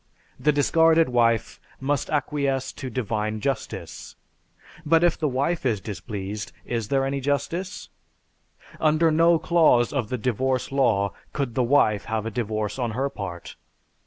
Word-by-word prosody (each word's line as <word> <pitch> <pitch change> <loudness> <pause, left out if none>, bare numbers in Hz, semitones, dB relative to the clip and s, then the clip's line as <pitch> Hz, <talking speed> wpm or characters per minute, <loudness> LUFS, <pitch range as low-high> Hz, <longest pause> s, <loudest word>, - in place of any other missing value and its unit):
The 150 - +3
discarded 160 +2 +4
wife 115 -3 +1 0.2
must 140 +1 -1
acquiesce 140 -2 -1
to 130 - -7
"divine 110 -3 -2
justice." 135 0 -4 0.7
But 165 +1 +3
if 175 - +4
the 155 - -1
wife 140 +6 -1
is 115 -6 +1
displeased, 105 0 -6
is 115 -3 -2
there 135 +2 +1
any 140 +1 -1
justice? 165 +8 -2 0.9
Under 155 +1 +3
no 165 +2 +4
clause 155 -9 +3
of 125 -7 -1
the 125 - -2
Divorce 130 +3 -1
Law 110 -8 +2 0.2
could 135 -5 -2
the 130 - +1
wife 120 -5 +3
have 110 -1 -2
a 115 - -3
divorce 110 0 -3
on 120 -2 0
her 135 +1 0
part. 90 -7 -7
130 Hz, 145 wpm, -24 LUFS, 110-145 Hz, 0.9 s, discarded